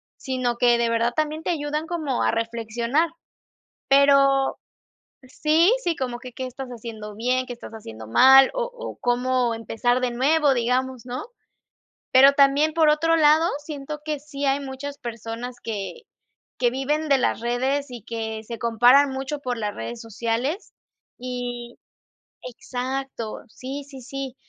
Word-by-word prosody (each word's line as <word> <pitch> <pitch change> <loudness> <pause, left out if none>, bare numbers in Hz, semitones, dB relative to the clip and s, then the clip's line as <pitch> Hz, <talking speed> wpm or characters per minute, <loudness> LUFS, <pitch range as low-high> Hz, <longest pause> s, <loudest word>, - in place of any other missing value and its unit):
sino 255 -2 -2
que 240 -1 +4
de 235 0 +1
verdad 230 +1 +1
también 310 +1 -1
te - - -2
ayudan 300 -2 -2
como 315 -6 -2
a - - +3
reflexionar. 235 +6 -1 0.8
Pero 275 -1 +4 0.7
sí, 310 - +3
sí, 345 -2 0
como 245 -3 -4
que 250 -1 -10
¿qué 260 - -5
estás 255 +1 -7
haciendo 220 -3 -8
bien?, 255 +3 0
¿qué 245 - -5
estás 240 - -11
haciendo 110 - -9
mal? 265 - +7
o - - -1
o - - -8
cómo 245 -1 +1
empezar 230 +2 0
de 250 -1 -1
nuevo, 285 +4 +3
digamos, 250 +1 -1
¿no? 250 +1 -4 0.9
Pero 270 +2 +8
también, 285 +2 +4
por 320 -2 +5
otro 330 +2 +3
lado, 315 +1 +5 0.2
siento 300 0 -6
que 305 -2 -3
sí 285 -1 -6
hay 275 +1 +2
muchas 280 +1 -7
personas 235 +1 -6
que 220 - -5 0.6
que 245 -1 +3
viven 295 +5 -1
de 275 -1 +4
las 245 - 0
redes 260 +4 0
y 240 -3 -8
que 220 -1 -4
se 230 +1 -7
comparan 245 +5 +5
mucho 270 +2 -4
por 250 -3 -3
las 210 -2 -3
redes 235 -1 -6
sociales 235 - -3 0.5
y 245 -1 -6 0.6
Exacto, 250 -1 -5
sí, 270 +5 -7
sí, 275 -2 -11
sí. 275 0 -6
255 Hz, 150 wpm, -24 LUFS, 240-285 Hz, 0.9 s, Pero